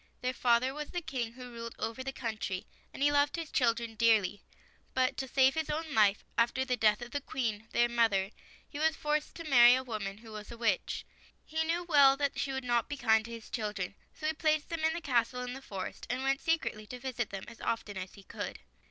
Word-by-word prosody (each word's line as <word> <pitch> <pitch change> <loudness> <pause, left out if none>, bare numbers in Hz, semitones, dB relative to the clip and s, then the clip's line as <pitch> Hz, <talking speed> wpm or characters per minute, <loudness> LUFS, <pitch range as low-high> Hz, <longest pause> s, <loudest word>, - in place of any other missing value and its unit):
Their 255 0 0
father 250 +1 +3
was 300 0 -5
the 355 - -3
King 245 -7 -3
who 250 0 -9
ruled 230 -1 -7
over 230 +3 -3
the 270 - -3
country, 215 -7 -4 0.3
and 275 - -3
he 290 - +5
loved 290 0 +3
his 330 -3 -5
chil 235 -3 +3
dren 235 -1 -5
dearly. 215 -3 +3 0.5
But, 255 0 +2
to 265 - -3
save 265 +1 +4
his 320 -1 -2
own 310 0 -2
life, 210 -3 +4
after 240 +3 +2
the 255 -1 +1
death 215 0 +3
of 240 - -9
the 285 - -2
Queen, 225 -5 -3
their 240 - +4
mother, 220 -5 +2 0.4
he 290 - -7
was 320 +1 +3
forced 300 0 -1
to 335 - -7
marry 245 -5 +8
a 260 - -1
woman 210 -5 -4
who 225 0 -13
was 210 +1 -8
a 235 - -8
witch. 230 -1 0 0.4
He 320 +1 -1
knew 340 +2 0
well 285 -5 +6
that 280 -1 -1
she 280 - -1
would 265 0 -3
not 240 -2 +1
be 290 - -3
kind 220 -4 +4
to 235 - -8
his 230 -1 -9
children, 210 -5 -3 0.2
so 305 - -9
he 310 - +2
placed 310 -1 +1
them 330 -1 -3
in 320 0 +3
the 340 - -4
castle 250 -3 +1
in 250 0 -4
the 270 - -8
forest, 195 -7 -6
and 255 +2 -1
went 270 0 +1
secretly 310 -10 -1
to 250 - -7
visit 245 -3 -3
them 195 -1 -6
as 230 -1 -12
often 225 -3 -2
as 185 -1 -6
he 200 - -13
could. - - -6
250 Hz, 240 wpm, -31 LUFS, 225-285 Hz, 0.5 s, marry